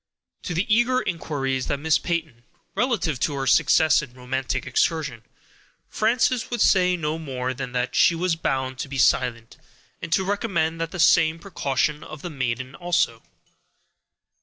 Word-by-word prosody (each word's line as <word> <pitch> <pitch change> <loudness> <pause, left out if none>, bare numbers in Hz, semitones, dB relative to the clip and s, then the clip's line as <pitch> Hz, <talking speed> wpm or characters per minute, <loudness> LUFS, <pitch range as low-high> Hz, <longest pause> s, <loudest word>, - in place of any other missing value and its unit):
To 175 - -5
the 180 +5 +1
eager 240 +4 +3
inquiries 135 - -2
of 140 - -1
Miss 160 +2 +2
Peyton, 160 -9 -3 0.3
relative 205 - 0
to 145 - 0
her 135 -1 -2
success 155 +4 +4
in 125 -4 -11
her - - -16
romantic 130 0 -2
excursion, 135 -2 0 0.7
Frances 230 +2 +1
could 240 - -4
say 180 -1 +4
no 155 0 -2
more 130 -4 -3
than 130 -1 -6
that 125 0 -1
she 170 - +4
was 175 0 0
bound 130 -4 -2
to - - -3
be 140 - -5
silent, 125 -3 +1 0.4
and - - -6
to 190 - +2
recommend 185 -5 -1
the 165 +2 -4
same 160 -1 +4
precaution 150 -5 -1
to - - -11
the 165 +4 -7
good 145 -4 -12
maiden 130 +1 -2
also. 170 -9 0
155 Hz, 160 wpm, -24 LUFS, 130-175 Hz, 0.7 s, success